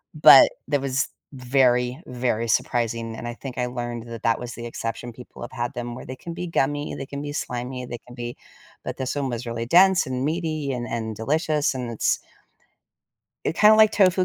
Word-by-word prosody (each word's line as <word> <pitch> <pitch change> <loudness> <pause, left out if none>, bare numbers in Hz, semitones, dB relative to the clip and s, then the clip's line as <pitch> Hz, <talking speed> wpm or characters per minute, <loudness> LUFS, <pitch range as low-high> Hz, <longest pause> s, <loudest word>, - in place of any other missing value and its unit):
but - - +9 0.2
that 145 -2 +1
was 140 +1 0 0.3
very, 125 -1 +2
very 120 -2 -1
surprising 115 0 0
and 120 - -6
I 120 - -4
think 130 -1 -8
I 125 - 0
learned 120 -1 -5
that 115 -1 -7
that 115 -1 +2
was 120 0 -6
the 120 - -7
exception. 115 +1 -5
People 125 +2 -13
have 120 - -7
had 120 +1 -3
them 120 0 -4
where - - -9
they 130 - -6
can 170 - -7
be 180 - -4
gummy, 145 -2 0
they 135 - -5
can 140 0 -6
be 145 0 -5
slimy, 125 -1 -4
they 120 - -5
can 125 - -11
be 120 0 -6 0.5
but - - -4
this 130 +1 -3
one 140 -2 -1
was 120 0 -4
really 115 0 -3
dense 185 +7 +5
and 130 0 -2
meaty 155 -3 -1
and 120 -1 -4
and 110 -2 -3
delicious 150 +5 0
and 125 -2 -4
it's 115 - +1 1.3
it 160 - -1
kinda 215 +1 +7
like 215 -1 +7
tofu, 185 -2 +4
125 Hz, 205 wpm, -24 LUFS, 120-145 Hz, 1.3 s, but